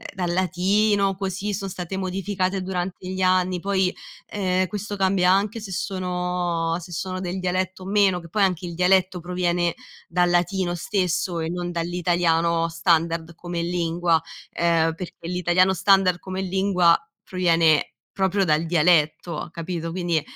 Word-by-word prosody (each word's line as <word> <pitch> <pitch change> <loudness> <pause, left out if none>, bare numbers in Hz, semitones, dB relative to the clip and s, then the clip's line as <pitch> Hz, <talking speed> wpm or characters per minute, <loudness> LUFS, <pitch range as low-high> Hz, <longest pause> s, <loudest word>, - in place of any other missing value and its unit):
dal 175 -2 -1
latino, 195 +2 +2
così 195 +2 -3
son 195 0 -3
state 180 +1 -5
modificate 190 0 -2
durante 180 0 -4
gli 190 0 -3
anni, 185 -1 +2
poi, 190 -1 0 0.3
ehm, 185 -2 0
questo 205 +1 -5
cambia 190 -1 +2
anche 205 +4 +1
se 205 -3 -8
sono 180 -3 -2
se 175 +1 -11
sono 185 +2 -4
del 185 0 -4
dialetto 185 +1 -2
o - - -9
meno 195 -2 +3
che 170 -1 -12
poi 210 +3 -1
anche 180 -2 +1
il 170 - -6
dialetto 180 +1 +2
proviene 175 -1 -1 0.3
dal 175 +1 +2
latino 175 0 +1
stesso, 175 -1 -1
e 160 0 -2
non 175 0 -3
dall'italiano 170 -1 +1
standard 165 0 0
come 175 -1 -4
lingua, 170 -1 +1 0.3
ehm, 165 -1 +2
perché 170 -1 -8
l'italiano 180 +1 +2
standard 190 -1 +4
come 190 +1 -5
lingua, 185 -2 +3 0.3
proviene 165 -4 +2 0.3
proprio 190 +1 +2
dal 155 -1 +2
dialetto, 165 -1 +2
capito? 165 0 -5
Quindi, 175 -3 0
180 Hz, 145 wpm, -23 LUFS, 170-190 Hz, 0.3 s, standard